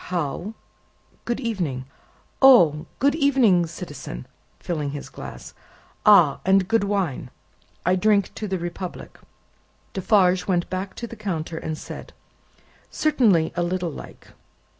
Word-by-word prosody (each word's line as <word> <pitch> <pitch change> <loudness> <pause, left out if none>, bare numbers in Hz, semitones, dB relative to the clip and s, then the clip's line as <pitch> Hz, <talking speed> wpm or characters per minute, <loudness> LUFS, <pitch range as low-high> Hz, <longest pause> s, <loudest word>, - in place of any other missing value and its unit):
"How?" 175 +4 -3 0.7
"Good 240 - -2
evening." 175 - -3 0.6
"Oh! 175 - +6
Good 280 +2 +3
evening, 255 - +3
citizen," 145 - -8 0.3
filling 155 -5 -3
his 145 - -7
glass. - - -9 0.5
"Ah! - - +6
and 190 0 +3
good 225 0 +2
wine. 190 -11 -2 0.6
I 180 +2 +3
drink 200 +1 +2
to 215 - -5
the 190 -1 -1
Republic." 175 +1 -7 0.7
Defarge 185 -2 +2
went 175 -3 +1
back 185 +1 -4
to 235 - -5
the 230 - -9
counter, 170 -6 -4
and 155 -1 -4
said, - - -9 0.8
"Certainly, 225 - +2
a 175 - 0
little 175 -1 -1
like." - - -11
185 Hz, 125 wpm, -23 LUFS, 165-215 Hz, 0.8 s, Oh